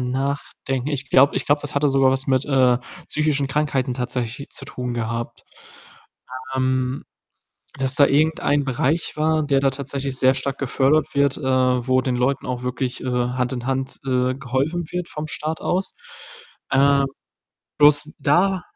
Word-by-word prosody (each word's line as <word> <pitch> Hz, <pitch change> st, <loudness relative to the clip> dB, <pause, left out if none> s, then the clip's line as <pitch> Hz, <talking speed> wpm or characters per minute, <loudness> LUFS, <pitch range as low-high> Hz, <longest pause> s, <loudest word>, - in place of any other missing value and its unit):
nachdenken. 135 Hz, 0 st, -3 dB
Ich 140 Hz, -3 st, -2 dB
glaube 140 Hz, +2 st, +5 dB
ich -, -, -1 dB
glaube 145 Hz, +1 st, +3 dB
das 145 Hz, 0 st, -6 dB
hatte 145 Hz, +1 st, +2 dB
sogar 135 Hz, -1 st, +4 dB
was 130 Hz, 0 st, -1 dB
mit, 130 Hz, 0 st, +2 dB
äh, 130 Hz, -3 st, +3 dB, 0.3 s
psychischen 150 Hz, -2 st, 0 dB
Krankheiten 135 Hz, -2 st, -1 dB
tatsächlich 125 Hz, +1 st, -3 dB
zu -, -, -6 dB
tun 125 Hz, -1 st, -5 dB
gehabt. 115 Hz, 0 st, -4 dB, 1.1 s
Ähm, 130 Hz, 0 st, 0 dB, 0.7 s
dass 130 Hz, 0 st, 0 dB
da 140 Hz, 0 st, +6 dB
irgendein 145 Hz, -1 st, +2 dB
Bereich 135 Hz, +5 st, -1 dB
war, 155 Hz, 0 st, +1 dB
der 140 Hz, -2 st, +2 dB
da 135 Hz, -, +3 dB
tatsächlich 135 Hz, 0 st, -4 dB
sehr 130 Hz, 0 st, +4 dB
stark 135 Hz, +1 st, -3 dB
gefördert 140 Hz, +3 st, +2 dB
wird, 140 Hz, -1 st, +2 dB
äh, -, -, -9 dB
wo 130 Hz, -1 st, +2 dB
den 130 Hz, -1 st, -1 dB
Leuten 130 Hz, +2 st, 0 dB
auch 125 Hz, -1 st, -3 dB
wirklich, 125 Hz, 0 st, -3 dB
äh, -, -, -5 dB
Hand 125 Hz, 0 st, -1 dB
in 125 Hz, -1 st, -4 dB
Hand, 135 Hz, 0 st, -2 dB
äh, 130 Hz, 0 st, +1 dB
geholfen 135 Hz, +6 st, -2 dB
wird 180 Hz, -1 st, -4 dB
vom 150 Hz, 0 st, -5 dB
Staat 155 Hz, +1 st, -4 dB
aus. 185 Hz, +2 st, -1 dB, 0.8 s
Äh, 140 Hz, +1 st, +4 dB, 0.7 s
bloß 150 Hz, +1 st, +5 dB
da 180 Hz, +6 st, +2 dB
135 Hz, 155 wpm, -22 LUFS, 130-145 Hz, 1.1 s, da